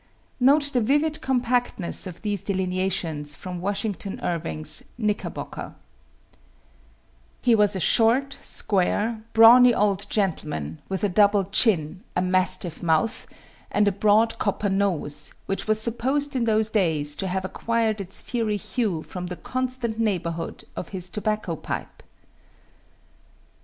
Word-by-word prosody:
Note 285 +3 +4
the 250 - +2
vivid 295 +6 +1
compactness 245 -8 0
of 180 +2 -10
these 205 -3 -1
delineations 180 -6 -2
from 180 -2 -7
Washington 200 0 -3
Irving's 165 -2 0
"Knickerbocker:" 210 -3 -4 1.7
He 245 - +4
was 210 -2 +3
a - - -2
short, 240 +9 +3
square, 210 +3 0
brawny 235 +2 +8
old 200 -1 +1
gentleman, 150 - -2
with 190 0 -3
a - - +4
double 205 +1 +4
chin, 185 -4 +1
a 180 - +2
mastiff 185 -2 0
mouth, 165 +6 0 0.4
and 205 0 +2
a - - +4
broad 215 +3 +2
copper 205 0 0
nose, 170 -7 -1
which 195 - -3
was 215 0 +2
supposed 265 +6 +1
in 245 -2 +1
those 220 -1 +2
days 155 -8 +1
to 190 - -2
have 190 +1 -2
acquired 220 +2 -1
its 190 0 -2
fiery 225 -4 -1
hue 200 -6 -2
from 180 -1 -6
the 180 - -5
constant 255 -3 -3
neighborhood 170 -6 -2
of 175 - -6
his 180 -2 -4
tobacco 210 -4 -2
pipe. - - -6
205 Hz, 130 wpm, -24 LUFS, 180-230 Hz, 1.7 s, brawny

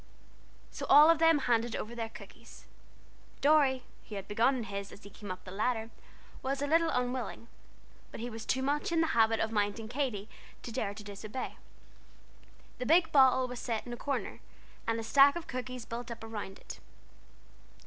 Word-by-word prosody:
So - - -6
all 300 +4 +9
of 330 - +2
them 325 -1 +5
handed 240 -4 +1
over 225 - -5
their 230 -1 -4
cookies. 225 +2 -14 0.7
Dorry, 275 -3 +4 0.3
who 210 - -6
had 195 -1 -6
begun 230 +6 +2
on 245 - -3
his 200 -1 -6
as 200 - -13
he 200 - -12
came 205 0 -10
up 185 0 -6
the 185 - -10
ladder, 225 +3 -1 0.5
was 270 +1 -2
a 285 - 0
little 325 +3 +3
unwilling, 250 -3 -2 0.6
but - - -9
he 235 - -4
was 225 -2 -7
too 260 +3 0
much 290 +4 0
in 330 -1 +3
the - - +3
habit 225 -1 +3
of 225 - 0
minding 210 +1 -1
Katy 240 -5 -2 0.4
to 235 - -6
dare 205 -2 -2
to 210 - -9
disobey. 205 +5 -6 1.2
The 250 - -3
big 325 +1 +4
bottle 260 -2 +5
was 250 -1 -6
set 230 -3 -3
in 240 - -6
a - - -3
corner, 280 +3 -3 0.5
and 230 0 0
a - - -4
stack 280 +5 +6
of 345 -1 -5
cookies 255 -4 -5
built 235 +1 -6
up 230 -1 -7
around 210 -3 -6
it. - - -10
240 Hz, 190 wpm, -31 LUFS, 220-270 Hz, 1.2 s, all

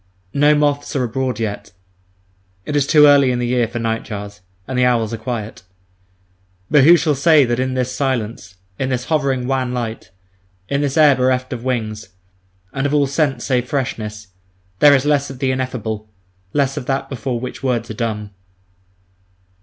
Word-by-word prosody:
No 145 +1 +4
moths 145 0 0
are 130 - +1
abroad 125 +1 -2
yet; 105 -2 -4 0.9
it 150 - -3
is 140 -1 +2
too 150 -1 +6
early 140 -2 +6
in 125 - -1
the 120 - -1
year 120 -1 +1
for 120 +2 -6
nightjars; 105 -3 -4 0.3
and 130 - -4
the 125 - +2
owls 120 -3 +1
are - - -3
quiet. 110 -1 -5 1.1
But 145 -3 +6
who 170 +3 +8
shall 155 -2 +1
say 145 +1 +4
that 120 0 -1
in 130 0 -1
this 130 0 -2
silence, 115 -9 -3 0.2
in 130 - -1
this 125 -1 -2
hovering 140 -5 0
wan 130 -1 -1
light, 115 -5 -5 0.6
in 140 0 -1
this 145 +1 -1
air 150 -3 +6
bereft 130 0 0
of 120 -1 -6
wings, 110 -5 -3 0.6
and 135 +1 -1
of 145 - -1
all 145 -1 +3
scent 135 -3 -1
save 125 -2 0
freshness, 105 -6 -4 0.5
there 145 -1 +7
is 135 0 0
less 145 -1 +1
of 135 - -8
the 130 0 0
ineffable, 110 -5 -4 0.4
less 140 +1 0
of 130 - -5
that 135 0 -1
before 125 -1 -4
which 125 - -7
words 120 -3 -1
are - - -4
dumb? 105 -3 -4
130 Hz, 175 wpm, -19 LUFS, 115-140 Hz, 1.1 s, who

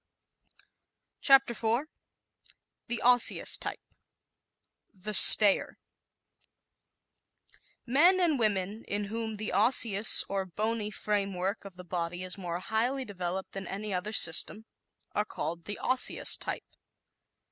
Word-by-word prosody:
_ - - -27 0.6
CHAPTER 270 -3 +4
IV 235 +5 -2 1.0
The 240 - -4
Osseous 245 0 +3
Type - - -7 1.1
"The 200 +3 -7
Stayer" 205 0 +6 2.1
Men 330 +10 +3
and 325 -7 0
women 205 0 -2
in 205 +1 -3
whom 225 -1 -5
the 215 +1 -6
Osseous 220 -2 +4
or 195 -1 -3
bony 215 +3 -3
framework 200 -2 -4
of 195 -2 -12
the 180 0 -12
body 175 0 -5
is 185 -1 -5
more 175 -3 -6
highly 245 +6 -2
developed 190 -2 -6
than 195 -2 -8
any 200 +1 -6
other 185 +4 -4
system 210 +3 -1 0.5
are 210 - -1
called 170 -4 -6
the 205 - -7
Osseous 255 0 +2
type. - - -6
210 Hz, 115 wpm, -28 LUFS, 190-230 Hz, 2.1 s, Stayer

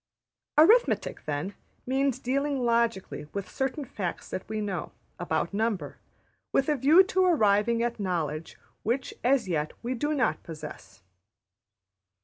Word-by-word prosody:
Arithmetic, 430 +11 +4
then, 150 +7 -2 0.3
means 270 0 +1
dealing 275 +1 -1
logically 230 -9 0
with 200 -2 -4
certain 265 +8 -2
facts 185 -7 -5
that 185 - -5
we 220 0 -2
know, 195 -6 -3 0.3
about 170 +1 -1
number, 205 -8 -1 0.5
with 270 - +2
a 300 - +3
view 300 +8 +6
to 375 0 +1
arriving 230 - +3
at 235 -1 -2
knowledge 165 -5 -2 0.2
which 245 +4 -1
as 255 -2 +3
yet 155 -4 -1
we 245 +2 -1
do 295 +5 -1
not 255 -5 +1
possess. 155 - -10
230 Hz, 130 wpm, -28 LUFS, 185-270 Hz, 0.5 s, view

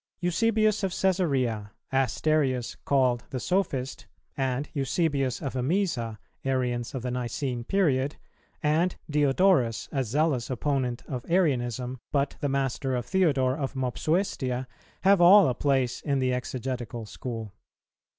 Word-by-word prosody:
Eusebius 215 +4 +2
of 195 - 0
Cæsarea, 140 - 0 0.2
Asterius 135 0 +1
called 130 -3 +2
the 130 - -3
Sophist, 140 -7 -1 0.3
and 135 +1 -1
Eusebius 140 -2 0
of 135 - -3
Emesa, 130 - -1 0.3
Arians 125 -2 -1
of 125 - -4
the 125 - -2
Nicene 125 0 -3
period, 145 -4 +1 0.5
and 160 +4 +2
Diodorus, 145 - +2
a 135 -2 0
zealous 135 +1 0
opponent 130 -1 -1
of 125 -3 -4
Arianism, 130 - 0
but 140 -1 0
the 145 - -1
master 135 -1 -1
of 120 -2 -2
Theodore 140 -9 +2
of 135 -2 -4
Mopsuestia, 130 -1 -1 0.4
have 195 -1 +5
all 190 +2 +8
a 125 - +1
place 130 -1 0
in 140 -2 0
the 130 -1 +1
Exegetical 125 -2 -4
School. 110 -1 -6
135 Hz, 125 wpm, -27 LUFS, 125-155 Hz, 0.5 s, all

